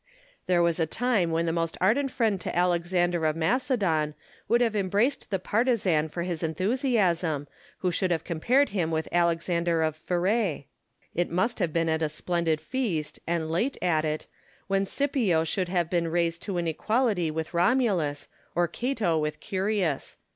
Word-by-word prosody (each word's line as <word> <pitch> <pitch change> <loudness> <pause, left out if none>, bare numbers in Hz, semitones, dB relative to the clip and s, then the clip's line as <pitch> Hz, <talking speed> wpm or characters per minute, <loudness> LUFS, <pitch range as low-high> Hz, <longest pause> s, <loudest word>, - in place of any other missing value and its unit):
There 175 -1 +3
was 170 0 +1
a 160 - +2
time 220 -3 +1
when 165 +1 0
the 165 - 0
most 165 -1 -1
ardent 255 +9 +2
friend 220 -7 0
to - - -4
Alexander 175 -1 +1
of 155 - 0
Macedon 165 - +1 0.3
would 235 - +3
have 230 -3 +1
embraced 205 +7 0
the 195 - 0
partisan 190 -7 +1
for 170 +2 -4
his 175 -3 -3
enthusiasm, 180 - 0 0.3
who 180 - +1
should 185 +2 0
have 165 -3 0
compared 245 - +2
him 180 -5 -1
with 160 -1 -1
Alexander 170 -1 +1
of 155 -1 0
Pherte. 180 0 0 0.5
It 175 +1 0
must 225 +8 0
have 175 -5 0
been 165 +1 +1
at 160 0 0
a 155 - +1
splendid 165 0 -1
feast, 180 - -2
and 165 -2 -1
late 230 +12 0
at 160 -4 +1
it, 155 0 -2 0.4
when 195 0 0
Scipio 235 - +1
should 180 +3 -1
have 175 -2 +1
been 170 -1 0
raised 170 0 0
to 195 -4 -3
an 170 - -1
equality 205 +1 +1
with 160 +2 -4
Romulus, 175 - +1 0.3
or 175 0 +3
Cato 210 -5 0
with 150 0 -2
Ourius. 190 -6 -1
175 Hz, 170 wpm, -27 LUFS, 160-205 Hz, 0.5 s, There